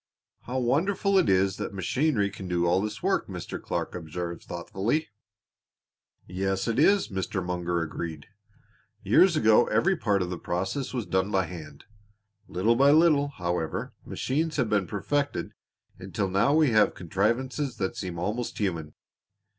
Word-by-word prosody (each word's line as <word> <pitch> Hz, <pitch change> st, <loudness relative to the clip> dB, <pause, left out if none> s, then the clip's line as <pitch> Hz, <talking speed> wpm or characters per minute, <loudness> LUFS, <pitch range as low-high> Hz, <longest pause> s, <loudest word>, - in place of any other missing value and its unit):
"How 125 Hz, +2 st, -2 dB
wonderful 190 Hz, -, +2 dB
it 180 Hz, -, +2 dB
is 95 Hz, 0 st, +2 dB
that 100 Hz, -, -5 dB
machinery 105 Hz, -, +1 dB
can 95 Hz, -1 st, -8 dB
do 85 Hz, -1 st, 0 dB
all 90 Hz, +2 st, +3 dB
this 105 Hz, +5 st, -5 dB
work," 190 Hz, +1 st, +1 dB
Mr. 90 Hz, -5 st, -6 dB
Clark -, -, -3 dB
observed 85 Hz, 0 st, -5 dB
thoughtfully. 100 Hz, -, -2 dB, 1.2 s
"Yes, 95 Hz, +2 st, -2 dB
it 115 Hz, +2 st, 0 dB
is," 195 Hz, -, +4 dB
Mr. 95 Hz, -1 st, -3 dB
Munger 90 Hz, -1 st, -1 dB
agreed. 80 Hz, 0 st, -6 dB, 0.8 s
"Years 170 Hz, -, +5 dB
ago 110 Hz, -3 st, +5 dB
every 190 Hz, +2 st, +2 dB
part 105 Hz, -, +1 dB
of 90 Hz, -, -5 dB
the 90 Hz, -, -4 dB
process 95 Hz, +10 st, -2 dB
was 125 Hz, -5 st, -3 dB
done 95 Hz, +1 st, 0 dB
by 95 Hz, -2 st, +2 dB
hand. 85 Hz, -4 st, -10 dB, 0.6 s
Little 110 Hz, +6 st, +2 dB
by 140 Hz, +3 st, +5 dB
little, 150 Hz, -2 st, +5 dB
however, 85 Hz, -, -3 dB
machines 155 Hz, +4 st, -2 dB
have 125 Hz, -6 st, 0 dB
been 100 Hz, -3 st, +2 dB
perfected 140 Hz, -, -2 dB, 0.5 s
until 95 Hz, +1 st, -3 dB
now 105 Hz, +10 st, +3 dB
we 155 Hz, -5 st, +4 dB
have 110 Hz, -1 st, +4 dB
contrivances 120 Hz, -, -1 dB
that 95 Hz, -3 st, -2 dB
seem 90 Hz, -2 st, -5 dB
almost 105 Hz, +7 st, -3 dB
human. 85 Hz, -7 st, -2 dB
100 Hz, 150 wpm, -27 LUFS, 90-135 Hz, 1.2 s, Years